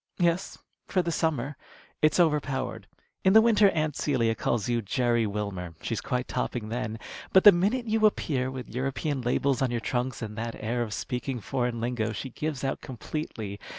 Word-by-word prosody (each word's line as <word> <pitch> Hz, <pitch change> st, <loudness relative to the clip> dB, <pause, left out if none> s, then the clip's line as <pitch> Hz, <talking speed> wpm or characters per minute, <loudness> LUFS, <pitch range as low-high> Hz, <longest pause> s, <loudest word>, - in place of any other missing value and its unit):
"Yes, 175 Hz, +1 st, +1 dB, 0.3 s
for 185 Hz, -, +1 dB
the 170 Hz, -, -1 dB
summer. 150 Hz, -4 st, -1 dB, 0.4 s
It's 155 Hz, +3 st, +4 dB
over 155 Hz, -4 st, +5 dB
powered. 130 Hz, -7 st, -4 dB, 0.4 s
In 190 Hz, -, +5 dB
the 220 Hz, -, +10 dB
winter 215 Hz, -3 st, +5 dB
Aunt 155 Hz, -4 st, -1 dB
Celia 120 Hz, -6 st, +1 dB
calls 110 Hz, -1 st, -1 dB
you 120 Hz, -1 st, +1 dB
'Jerry 120 Hz, +1 st, +1 dB
Wilmer.' 100 Hz, -5 st, -4 dB
She's 115 Hz, -, -2 dB
quite 125 Hz, 0 st, -2 dB
topping 110 Hz, -3 st, -2 dB
then. 110 Hz, -1 st, -3 dB, 0.4 s
But 190 Hz, -, +7 dB
the 205 Hz, -, +11 dB
minute 205 Hz, +8 st, +1 dB
you 220 Hz, -1 st, +4 dB
appear 130 Hz, -10 st, -1 dB
with 130 Hz, -4 st, -7 dB
European 135 Hz, +2 st, -1 dB
labels 125 Hz, +2 st, +1 dB
on 130 Hz, -, +2 dB
your 120 Hz, 0 st, -1 dB
trunks 125 Hz, +1 st, -2 dB
and 105 Hz, -1 st, -6 dB
that 115 Hz, 0 st, -3 dB
air 120 Hz, +3 st, -2 dB
of 110 Hz, -2 st, -2 dB
speaking 125 Hz, +2 st, -3 dB
foreign 120 Hz, +1 st, -2 dB
lingo, 115 Hz, -2 st, -1 dB
she 130 Hz, +4 st, -5 dB
gives 150 Hz, 0 st, -3 dB
out 135 Hz, -, -1 dB
completely. 115 Hz, -6 st, -5 dB
125 Hz, 185 wpm, -28 LUFS, 115-155 Hz, 0.4 s, the